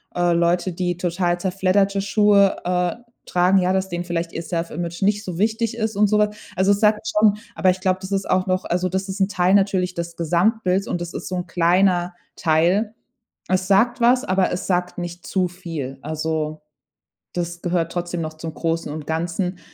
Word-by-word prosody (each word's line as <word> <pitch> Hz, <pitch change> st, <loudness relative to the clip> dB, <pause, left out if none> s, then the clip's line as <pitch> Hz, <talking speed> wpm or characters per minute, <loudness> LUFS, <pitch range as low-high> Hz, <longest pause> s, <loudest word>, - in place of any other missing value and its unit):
Äh, 175 Hz, -1 st, +2 dB
Leute, 175 Hz, +1 st, +1 dB
die 175 Hz, 0 st, -2 dB
total 175 Hz, 0 st, 0 dB
zerfledderte 195 Hz, +2 st, +1 dB
Schuhe, 200 Hz, -1 st, +4 dB
äh, 180 Hz, -1 st, 0 dB, 0.3 s
tragen, 180 Hz, +2 st, +3 dB
ja, 180 Hz, 0 st, +1 dB
dass 190 Hz, 0 st, 0 dB
denen 175 Hz, 0 st, -3 dB
vielleicht 170 Hz, -1 st, -3 dB
ihr -, -, -3 dB
self-image 170 Hz, +1 st, -4 dB
nicht 205 Hz, +2 st, +2 dB
so 175 Hz, -3 st, -5 dB
wichtig 225 Hz, +2 st, 0 dB
ist 220 Hz, -2 st, -2 dB
und 210 Hz, 0 st, +5 dB
so 210 Hz, -, +2 dB
was. 210 Hz, 0 st, +1 dB, 0.2 s
Also, 190 Hz, +2 st, +3 dB
es 200 Hz, -, -2 dB
sagt 215 Hz, 0 st, +2 dB
schon 210 Hz, -1 st, +3 dB, 0.2 s
aber 185 Hz, -, +3 dB
ich 185 Hz, -, -5 dB
glaube, 185 Hz, -1 st, +1 dB
das 190 Hz, +1 st, -7 dB
ist 195 Hz, 0 st, -1 dB
auch 185 Hz, 0 st, +2 dB
noch 185 Hz, 0 st, 0 dB
Also, 180 Hz, +1 st, 0 dB
das 190 Hz, +2 st, -2 dB
ist 195 Hz, +1 st, -4 dB
'n 195 Hz, -, +3 dB
Teil 180 Hz, -1 st, +2 dB
natürlich 190 Hz, -2 st, +2 dB
des 170 Hz, 0 st, -5 dB
Gesamtbilds 185 Hz, +3 st, +1 dB
und 175 Hz, -, -2 dB
das 175 Hz, 0 st, -5 dB
ist -, -, -6 dB
so 185 Hz, -, -3 dB
'n 180 Hz, 0 st, -4 dB
kleiner 175 Hz, +1 st, +2 dB, 0.2 s
Teil. 180 Hz, +7 st, +2 dB, 0.6 s
Es 185 Hz, 0 st, +1 dB
sagt 235 Hz, +5 st, +3 dB
was, 245 Hz, +2 st, +4 dB
aber 190 Hz, 0 st, +1 dB
es 180 Hz, +2 st, -3 dB
sagt 180 Hz, -1 st, -1 dB
nicht 175 Hz, 0 st, -7 dB
zu 185 Hz, -2 st, +1 dB
viel. 160 Hz, -7 st, -6 dB
Also, 155 Hz, 0 st, -3 dB, 0.7 s
das 175 Hz, 0 st, -4 dB
gehört 170 Hz, -2 st, -1 dB
trotzdem 175 Hz, -1 st, -3 dB
noch 155 Hz, 0 st, -4 dB
zum 160 Hz, 0 st, -6 dB
Großen 165 Hz, -2 st, -2 dB
und 150 Hz, -1 st, -6 dB
Ganzen. 175 Hz, +3 st, -2 dB
180 Hz, 200 wpm, -22 LUFS, 170-195 Hz, 0.7 s, und